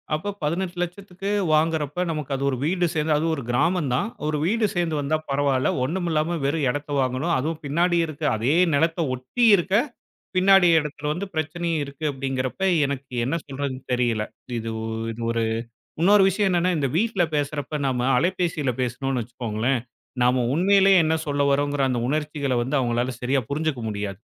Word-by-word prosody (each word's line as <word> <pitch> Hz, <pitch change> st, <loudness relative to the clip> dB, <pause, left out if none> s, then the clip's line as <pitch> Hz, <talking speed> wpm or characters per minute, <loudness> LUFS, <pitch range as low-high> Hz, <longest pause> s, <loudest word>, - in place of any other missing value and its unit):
அப்ப 200 Hz, +6 st, -4 dB
ரூ.18,00,000க்கு 180 Hz, +3 st, -3 dB, 0.2 s
வாங்குறப்ப 155 Hz, +1 st, +1 dB
நமக்கு 150 Hz, -3 st, -4 dB
அது 135 Hz, -, -3 dB
ஒரு 130 Hz, -, -2 dB
வீடு 175 Hz, +2 st, +1 dB
சேந்து 155 Hz, 0 st, +1 dB
அது 155 Hz, -, -1 dB
ஒரு 140 Hz, -, -6 dB
கிராமம் 150 Hz, +3 st, +1 dB
தான். 130 Hz, -, 0 dB, 0.2 s
ஒரு 155 Hz, 0 st, 0 dB
வீடு 220 Hz, +5 st, +2 dB
சேந்து 170 Hz, -3 st, 0 dB
வந்தா 150 Hz, +3 st, 0 dB
பரவால்ல. 140 Hz, -2 st, +1 dB
ஒண்ணும் 175 Hz, +7 st, -2 dB
இல்லாம 160 Hz, +2 st, 0 dB
வெறும் 145 Hz, +1 st, 0 dB
இடத்த 145 Hz, +3 st, -3 dB
வாங்கணும். 130 Hz, +6 st, 0 dB
அதுவும் 155 Hz, +4 st, -3 dB
பின்னாடி 170 Hz, +5 st, +2 dB
இருக்க. 155 Hz, 0 st, -8 dB
அதே 120 Hz, +8 st, +1 dB, 0.2 s
நிலத்த 165 Hz, +4 st, +1 dB
ஒட்டி 130 Hz, -, -3 dB
இருக்க, 190 Hz, 0 st, -2 dB, 0.6 s
பின்னாடி 195 Hz, -1 st, +6 dB
இடத்துல 150 Hz, -1 st, -4 dB
வந்து 180 Hz, +5 st, -4 dB
பிரச்சனையும் 160 Hz, +1 st, -1 dB
இருக்கு 140 Hz, +2 st, -7 dB
அப்டிங்குறப்ப 135 Hz, +4 st, -3 dB, 0.2 s
எனக்கு 140 Hz, -2 st, -5 dB
என்ன 140 Hz, +6 st, -1 dB
சொல்றதுன்னு 135 Hz, -1 st, -4 dB
தெரியல. 120 Hz, -3 st, +1 dB, 0.4 s
இது 115 Hz, 0 st, -5 dB
ஒ -, -, -3 dB, 0.4 s
ஒரு 115 Hz, -1 st, 0 dB, 0.6 s
இன்னொரு 200 Hz, +3 st, +6 dB
விஷயம் 195 Hz, +2 st, +1 dB
என்னன்னா, 180 Hz, 0 st, +2 dB
இந்த 140 Hz, -2 st, 0 dB
வீட்ல 210 Hz, 0 st, +2 dB
பேசுறப்ப 145 Hz, 0 st, -2 dB
நம்ம 125 Hz, -2 st, 0 dB
அலைபேசியில 170 Hz, -3 st, 0 dB
பேசணும்னு 130 Hz, +1 st, -1 dB
வெச்சுக்கோங்களேன், 120 Hz, +2 st, -2 dB, 0.4 s
நம்ம 125 Hz, +1 st, +3 dB
உண்மயிலயே 195 Hz, +3 st, +5 dB
என்ன 160 Hz, 0 st, +2 dB
சொல்ல 145 Hz, -1 st, -1 dB
வர்றோங்குற 145 Hz, 0 st, +1 dB
அந்த 125 Hz, -2 st, 0 dB
உணர்ச்சிகள 150 Hz, -1 st, -1 dB
வந்து, 130 Hz, +5 st, -2 dB
அவங்களால 120 Hz, 0 st, 0 dB
சரியா 130 Hz, +2 st, +1 dB
புரிஞ்சுக்க 150 Hz, -1 st, -1 dB
முடியாது, 100 Hz, -2 st, -4 dB
150 Hz, 160 wpm, -24 LUFS, 130-175 Hz, 0.6 s, பின்னாடி